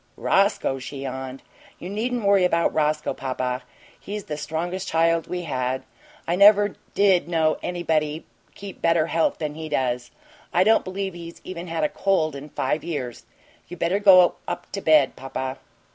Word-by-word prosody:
"Roscoe?" 195 -9 +1
she 135 +1 -7
yawned. 130 0 -6 0.3
"You 175 - -8
needn't 225 +3 -2
worry 200 -1 +5
about 170 -2 +2
Roscoe, 150 0 0
papa. 130 -1 -3 0.4
He's 205 +1 -6
the 150 - -5
strongest 165 +5 -4
child 165 0 +2
we 180 -1 -4
had. 130 -4 -2 0.4
I 170 - +1
never 205 +1 +6 0.2
did 190 -5 +3
know 160 -2 +1
anybody 160 -3 -1 0.3
keep 200 -1 -10
better 165 -1 +3
health 165 0 +1
than 150 -2 -3
he 160 0 -7
does. 125 -3 -1 0.4
I 180 - +4
don't 220 +3 +4
believe 190 0 -4
he's 170 -1 -10
even 180 -1 -7
had 165 -1 -2
a - - +4
cold 165 -6 0
in 140 +2 -8
five 150 +2 -1
years. 140 -8 -5 0.4
You 180 - -9
better 170 +5 +1
go 185 -3 +6
up - - -5
to 195 - -4
bed, 155 -5 +4
papa." 130 0 -5
165 Hz, 165 wpm, -24 LUFS, 145-185 Hz, 0.4 s, never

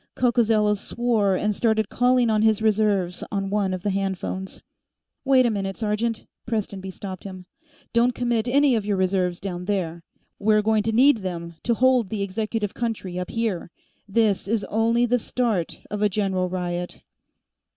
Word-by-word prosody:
Coccozello 225 -4 +3
swore 210 -1 0
and 210 +2 0
started 220 -1 +1
calling 245 -1 +3
on 215 -1 +2
his 220 -1 +3
reserves 205 -5 +1
on 195 -1 -2
one 200 -2 +1
of 185 -1 -4
the 205 - 0
handphones. 190 -1 -3 0.6
"Wait 265 -2 +4
a 235 - +2
moment, 195 -2 -3
sergeant," 220 +1 -1 0.2
Prestonby 200 -4 -3
stopped 190 -1 -7
him. 185 -2 -9 0.5
"Don't 235 +1 +3
commit 240 -2 0
any 280 +2 +4
of 220 -3 +1
your 205 -1 -1
reserves 185 -1 0
down 180 -2 -5
there. 175 -4 -2 0.4
We're 215 0 +3
going 220 0 +2
to 225 +2 -1
need 255 +4 +5
them 170 -4 -5
to 235 - +1
hold 250 -4 +3
the 205 -1 -2
executive 210 +1 -2
country, 210 -6 -3
up 180 - -4
here. 225 -7 -2 0.4
This 205 -2 +1
is 220 0 0
only 230 +2 +2
the 245 +1 +2
start 220 -8 -1
of 210 0 -3
a 210 - +3
general 190 -2 0
riot." 175 -1 -4
210 Hz, 165 wpm, -24 LUFS, 190-230 Hz, 0.6 s, need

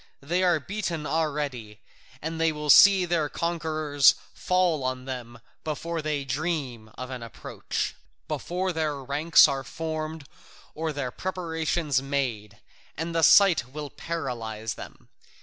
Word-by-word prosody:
They 170 +6 0
are 175 -3 +3
beaten 170 -2 -4
already, 145 -9 -2 0.4
and 160 +1 -3
they 165 0 +3
will 150 -1 +1
see 195 +2 +8
their 165 -4 0
conquerors 155 -4 +2 0.2
fall 180 -6 +1
on 130 0 -3
them 125 -3 -7 0.2
before 165 +2 -3
they 150 -2 -2
dream 135 -6 -3
of 130 0 -6
an 125 -2 -6
approach, 115 -1 -4 0.3
before 180 +1 -2
their 155 -2 -1
ranks 150 +5 +5
are 135 -2 -2
formed 155 +1 -5 0.5
or 160 0 -2
their 140 -4 -3
preparations 165 -5 -1
made, 125 -7 -3 0.4
and 165 +2 -3
the 165 - +1
sight 185 -6 +6
will 150 -2 -6
paralyse 115 -9 -4
them. - - -11
155 Hz, 130 wpm, -26 LUFS, 135-165 Hz, 0.5 s, see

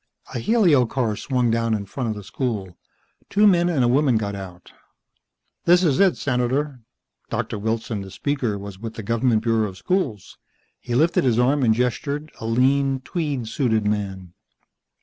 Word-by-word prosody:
A - - -2
helio 165 - +3
car 115 -4 -1
swung 125 0 0
down 115 -1 +1
in 100 -1 -4
front 120 +4 -4
of 110 - -2
the 105 - -8
school. 100 -6 -3 0.5
Two 210 +1 +3
men 175 -3 +4
and 150 -7 +1
a - - +3
woman 130 -1 +3
got 100 -2 -2
out. 95 -3 -9 0.9
"This 175 +2 +5
is 150 -7 +2
it, 195 -2 +4
Senator." 130 +2 -1 0.5
Doctor 105 - -3
Wilson, 110 0 -2
the 95 - -8
speaker, 125 -1 -2
was 100 -1 -9
with 115 +1 -7
the 110 - -6
government 115 +1 +1
bureau 110 -2 +1
of 95 - -12
schools. 135 - -2 0.4
He 120 - -4
lifted 165 +6 +3
his 120 -4 +2
arm 135 +4 +3
and 120 -4 +4
gestured, 140 +5 -2
a 110 - -5
lean, 135 +3 +2
tweed 145 -7 -3
suited 110 -4 0
man. 95 -4 -3
120 Hz, 170 wpm, -23 LUFS, 110-140 Hz, 0.9 s, This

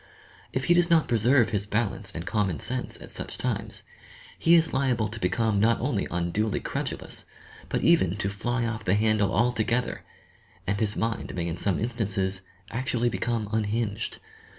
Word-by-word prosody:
If 130 - -1
he 175 - +4
does 175 0 +4
not 165 -2 +4
preserve 120 +2 +4
his 105 -1 -1
balance 105 -1 -1
and 85 +1 -4
common 95 -6 0
sense 130 0 -1
at - - -10
such - - -4
times, - - -3 0.6
he 165 +1 +6
is 165 -1 +3
liable 130 -5 +1
to 115 +1 -8
become 105 +3 +1
not 115 +3 +3
only 120 -5 -1
unduly 90 +5 0
credulous - - -4 0.4
but - - -1
even 105 - +4
to 100 - -1
"fly 120 +5 -1
off 115 -1 -3
the 95 -1 +2
handle" 105 -1 +2
altogether, 120 +3 +1 0.6
and 100 +2 0
his 105 -2 +2
mind 115 0 -2
may 85 -2 -2
in 85 -1 -2
some 95 -1 +1
instances 100 -5 -1 0.3
actually 120 0 0
become 115 -2 -1
unhinged. 110 -1 -1
110 Hz, 165 wpm, -27 LUFS, 100-120 Hz, 0.6 s, he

